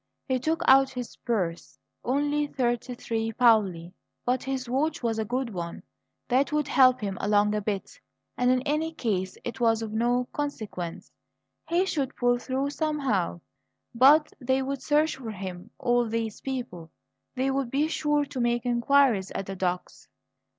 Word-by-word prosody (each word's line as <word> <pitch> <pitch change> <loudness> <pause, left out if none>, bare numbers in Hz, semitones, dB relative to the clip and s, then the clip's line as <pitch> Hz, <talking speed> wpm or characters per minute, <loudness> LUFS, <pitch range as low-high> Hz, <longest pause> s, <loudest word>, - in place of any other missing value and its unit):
He 260 -2 +1
took 320 +6 -1
out 270 0 +7
his 250 -3 -6
purse. 185 -8 -3 0.3
Only 290 +3 +1
thirty 245 -2 -1
three 225 -1 -2
paoli; 195 -8 +3 0.3
but 250 +1 +1
his 265 -2 -3
watch 280 +4 -1
was 225 -1 0
a 220 - -1
good 250 +2 -2
one. 170 -2 -5 0.4
That 265 +4 +2
would 300 -1 0
help 255 -2 +5
him 195 -3 -3
along 210 0 +3
a 210 - 0
bit; 200 -2 -4 0.4
and 250 0 +2
in 255 0 +2
any 305 +3 -1
case 190 -8 -2
it 240 - -5
was 225 -1 +2
of 215 -1 -5
no 240 +2 +1
consequence 215 - -5 0.6
he 345 +3 +2
should 280 -8 -2
pull 245 0 +2
through 265 +3 -2
somehow. 275 - -1 0.5
But 290 +6 +5
they 260 0 +1
would 275 0 -3
search 300 +1 +2
for 245 -4 -7
him, 190 -1 -7
all 240 -2 +1
these 225 -1 -3
people; 235 -11 -5 0.5
they 265 +1 +1
would 270 -2 -1
be 285 +5 +1
sure 295 -2 +1
to 275 -2 -6
make 240 0 0
inquiries 240 -4 +3
at 195 - -2
the 195 - -6
docks. 180 -1 -3
245 Hz, 165 wpm, -27 LUFS, 215-275 Hz, 0.6 s, out